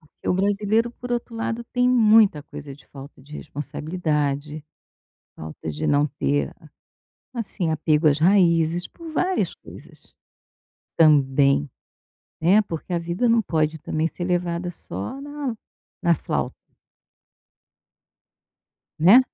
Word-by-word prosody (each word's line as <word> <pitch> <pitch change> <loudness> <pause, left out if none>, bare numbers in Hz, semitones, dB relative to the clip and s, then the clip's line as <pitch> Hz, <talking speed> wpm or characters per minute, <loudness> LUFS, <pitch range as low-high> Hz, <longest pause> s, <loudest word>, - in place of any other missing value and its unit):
Porque 155 - -11
o - - +3
brasileiro 205 +4 +1
por 245 0 -7
outro 240 0 -3
lado 225 +1 -3
tem 250 0 +2
muita 220 - +5
coisa 145 -2 -9
de 145 - -20
falta 135 -1 -12
de 145 +2 -16
responsabilidade, 150 -1 -3 0.7
falta 80 0 -7
de 75 - -3
não 145 +1 +3
ter 70 - -1
a - - -17 0.7
assim 190 -6 -1
apego 155 0 +2
às 145 0 +3
raízes, 170 -2 +3
por 330 -1 -11
várias 365 +4 0
coisas. - - -15 0.8
Também. 140 -2 +4 0.7
É, 190 +6 +5
porque 175 -3 -6
a 170 - +1
vida 175 +8 -1
não 230 0 +4
pode 160 -3 -1
também 155 +2 -1
ser 175 +1 -6
levada 175 0 -1
só 100 - -7
na 285 -4 -4 0.5
na 170 -1 +5
flauta. - - -3 2.4
Né? 195 +11 +8
170 Hz, 125 wpm, -23 LUFS, 150-215 Hz, 2.4 s, Né